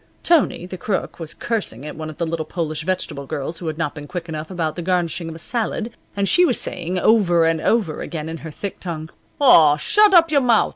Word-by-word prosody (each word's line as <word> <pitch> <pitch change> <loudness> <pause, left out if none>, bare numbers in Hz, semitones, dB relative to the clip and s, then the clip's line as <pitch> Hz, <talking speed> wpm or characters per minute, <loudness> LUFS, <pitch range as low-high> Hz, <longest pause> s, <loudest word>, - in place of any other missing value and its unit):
Tony, 310 - +2
the 185 0 -8
Crook, 200 -2 -3
was 165 -1 -6
cursing 195 - -3
at 150 - -7
one 155 0 -6
of 155 - -10
the 170 - -1
little 165 0 -2
Polish 155 -1 -4
vegetable 170 -6 -2
girls 155 +3 -4
who 170 - -6
had 155 -1 -3
not 160 -3 -2
been 145 -1 -9
quick 175 0 -5
enough 155 -1 -5
about 165 -4 -2
the 175 - -4
garnishing 175 -1 -1
of 160 - -7
a - - -8
salad, 230 +4 -3 0.3
and 200 0 +1
she 355 - +5
was 290 -9 +3
saying, 180 +1 -3
over 180 -5 +4
and 165 -1 +1
over 200 -8 +1
again, 160 -2 -5
in 165 0 -5
her 160 - -8
thick 195 +6 -6
tongue: 160 -3 -6 0.3
"Aw, 160 - +7
shod 420 - +4
op 330 -2 +6
yur 285 -2 +4
mout'!" 235 -4 +3
170 Hz, 235 wpm, -21 LUFS, 155-200 Hz, 0.3 s, Aw